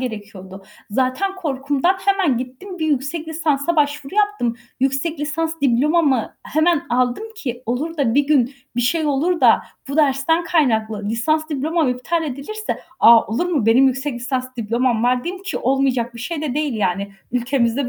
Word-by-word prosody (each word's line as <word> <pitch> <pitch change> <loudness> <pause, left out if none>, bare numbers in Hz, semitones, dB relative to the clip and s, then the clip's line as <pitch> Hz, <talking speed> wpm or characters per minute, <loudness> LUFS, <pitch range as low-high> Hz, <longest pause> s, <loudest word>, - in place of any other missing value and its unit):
gerekiyordu. 200 -5 -7 0.3
Zaten 260 - 0
korkumdan 290 +1 0
hemen 380 -11 +2
gittim 260 +10 -7
bir 315 - -1
yüksek 305 +3 -1
lisansa 315 0 0
başvuru 290 +2 0
yaptım. 415 - +1 0.2
Yüksek 275 +4 0
lisans 320 +2 -2
diplomamı 275 0 +2
hemen 315 +1 +1
aldım 250 - +1
ki, 250 - -5
olur 290 +8 -2
da 260 -6 +1
bir 285 0 +3
gün 275 -3 +2 0.2
bir - - +2
şey 310 +6 +1
olur 320 +5 +1
da - - +5 0.3
bu 280 - -3
dersten 300 +3 +2
kaynaklı 220 -10 +1
lisans 310 +8 0
diplomam 310 +1 0
iptal 250 +7 -1
edilirse 305 +11 -4 0.2
"A, 230 0 +7
olur 240 +11 -1
mu? 285 -11 0
Benim 245 +4 +6
yüksek 265 +1 -1
lisans 255 +1 -4
diplomam 235 +1 0
var." 250 0 +1
diyeyim 370 +2 -5
ki 395 - -3
olmayacak 255 -2 0
bir 235 - -8
şey 310 +4 -4
de 285 -5 -2
değil 295 -3 -1
yani. 200 -1 -1 0.2
Ülkemizde 245 +1 0
275 Hz, 160 wpm, -20 LUFS, 245-315 Hz, 0.3 s, A